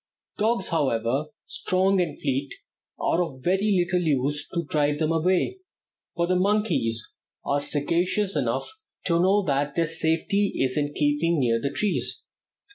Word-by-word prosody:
Dogs, 215 -2 +1
however 135 -3 0 0.2
strong 190 +1 +1
and 160 -5 -3
fleet, 135 -1 -2 0.4
are 175 - +1
of 130 -6 -8
very 190 +1 +2
little 180 0 0
use 145 -1 0
to 170 -2 -2
drive 150 -1 +1
them 155 0 0
away, 180 - +1 0.6
for 170 - +1
the 185 +1 +1
monkeys 185 - +1 0.3
are 140 0 +1
sagacious 175 +8 0
enough - - 0 0.4
to 170 -2 +2
know 195 +3 +3
that 140 -2 0
their 170 - +2
safety 165 +5 0
is 130 -1 0
in 145 -1 -1
keeping 150 +3 +1
near 115 -3 +1
the 140 - 0
trees. 205 +7 -1
165 Hz, 145 wpm, -25 LUFS, 145-185 Hz, 0.6 s, know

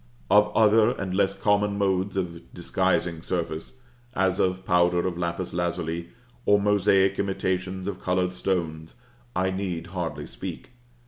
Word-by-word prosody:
Of 105 +1 +5
other 110 0 +5
and 95 -2 -3
less 100 0 +1
common 105 0 +2
modes 95 -1 0
of 85 -3 -4
disguising 85 -2 0
surface, 85 +8 -4 0.3
as 95 -1 +1
of 95 0 0
powder 90 -1 +3
of 90 -2 -1
lapis 85 +1 -3
lazuli, 85 -1 -2 0.3
or 105 -2 +4
mosaic 100 -1 +3
imitations 95 -1 -1
of 100 -3 -4
colored 90 0 0
stones, 80 -4 -2 0.4
I 95 +1 +1
need 95 -3 -3
hardly 80 -5 -3
speak. - - -8
95 Hz, 135 wpm, -26 LUFS, 85-100 Hz, 0.4 s, Of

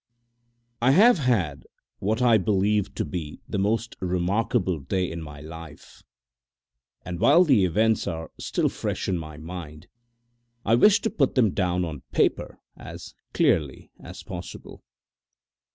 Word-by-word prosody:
I 130 +3 +4
have 215 - +6
had 95 - 0 0.3
what 110 +5 0
I 115 -3 +5
believe 100 +1 0
to - - -2
be 75 -1 -6
the 100 - -3
most 110 +4 -1
remarkable 90 +1 0
day 90 +6 -2
in 85 0 -6
my 75 -2 -10
life, 80 -1 -11 1.0
and 85 -1 -5
while 165 - +6
the 130 - +4
events 110 +5 +1
are 80 0 -5
still - - 0
fresh - - -3
in 90 -2 0
my 80 -2 -9
mind, 80 0 -9 0.8
I 115 - +2
wish 205 - +5
to 225 - -1
put 135 -5 +1
them 115 -7 +3
down 90 -1 0
on 75 -5 -7
paper - - 0 0.2
as - - -10 0.2
clearly 70 -4 0
as - - -10
possible. - - -9
95 Hz, 140 wpm, -25 LUFS, 80-115 Hz, 1.0 s, have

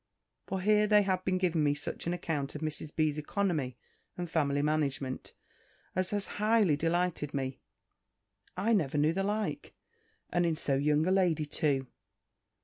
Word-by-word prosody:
For 190 -1 -2
here 210 +2 +4
they 210 -1 +5
have 185 -1 0
been 185 -1 +1
giving 175 -4 +1
me 145 -1 +2
such 145 +3 -4
an 170 - +1
account 150 -5 -3
of 150 - -5
Mrs. 155 -1 -3
B.'s 155 -1 +1
economy, 150 -7 -1 0.4
and 175 -1 -3
family 145 -3 +1
management, 140 -3 -1 0.6
as 185 0 +1
has 205 -1 0 0.2
highly 210 -7 +4
delighted 165 -1 -1
me. 130 -1 -3 1.0
I 215 +5 +2
never 155 -8 +1
knew 150 +2 +3
the 195 - -1
like; 210 +2 -2 0.6
and 175 - +2
in 165 -2 +1
so 145 -2 -1
young 150 +3 +2
a 185 - +2
lady 175 -5 +2
too. 145 -3 0
160 Hz, 160 wpm, -31 LUFS, 145-190 Hz, 1.0 s, they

